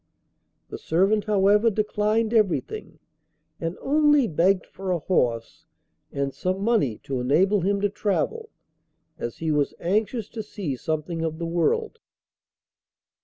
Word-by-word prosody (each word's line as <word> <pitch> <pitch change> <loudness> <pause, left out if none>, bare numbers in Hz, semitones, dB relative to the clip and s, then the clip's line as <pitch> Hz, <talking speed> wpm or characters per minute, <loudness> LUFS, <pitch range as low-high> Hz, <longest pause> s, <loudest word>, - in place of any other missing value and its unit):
The - - -7
servant, 195 +5 +1
however, 210 +2 +4
declined 215 +1 0
everything, 225 - 0 0.6
and 165 +1 -3
only 295 -1 +4
begged 180 +2 +2
for 190 0 -7
a 180 - +2
horse 120 -9 -1 0.4
and 140 -1 -2
some 185 +7 -2
money 205 - +1
to 135 -2 -3
enable 185 +11 +2
him 200 +3 +1
to 205 - +2
travel, 440 - -2 0.7
as 120 - -5
he 160 -1 -1
was 145 -1 0
anxious 210 +5 -1
to 225 - -5
see 200 -9 -5
something 160 +5 -3
of 160 -1 -2
the 170 - -4
world. 440 - 0
195 Hz, 130 wpm, -25 LUFS, 165-215 Hz, 0.7 s, however